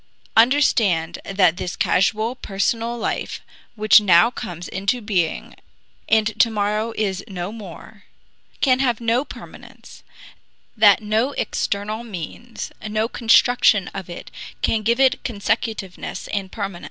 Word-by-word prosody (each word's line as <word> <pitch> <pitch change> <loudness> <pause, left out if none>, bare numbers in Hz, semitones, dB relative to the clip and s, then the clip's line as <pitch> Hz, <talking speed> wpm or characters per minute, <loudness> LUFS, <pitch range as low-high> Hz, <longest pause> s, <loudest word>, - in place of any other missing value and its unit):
Understand 225 - +3
that 185 -4 +2
this 180 - -4
casual, 215 +5 +1
personal 230 +1 -2
life - - -3 0.4
which 215 0 +6
now 195 +3 +5
comes 175 -7 -7
into 200 +6 -1
being 190 -7 -2 0.6
and 220 -1 +2
to 230 - +5
morrow 210 +1 -1
is 195 -3 -1
no 185 -2 -5
more 210 0 -11 0.6
can 255 -2 +3
have 250 -4 +1
no 235 +2 +1
permanence, - - -13 0.7
that 210 -1 +5
no 220 +6 0
external 210 0 -2
means, 225 +3 -7 0.2
no 215 +1 0
construction 230 -4 +3
of 190 -3 -8
it 175 - -9 0.3
can 220 - +1
give 235 +3 +1
it 265 -1 +3
consecutiveness 220 -3 -3
and 195 -2 -3
permanence. 200 -5 -5
215 Hz, 125 wpm, -21 LUFS, 195-230 Hz, 0.7 s, which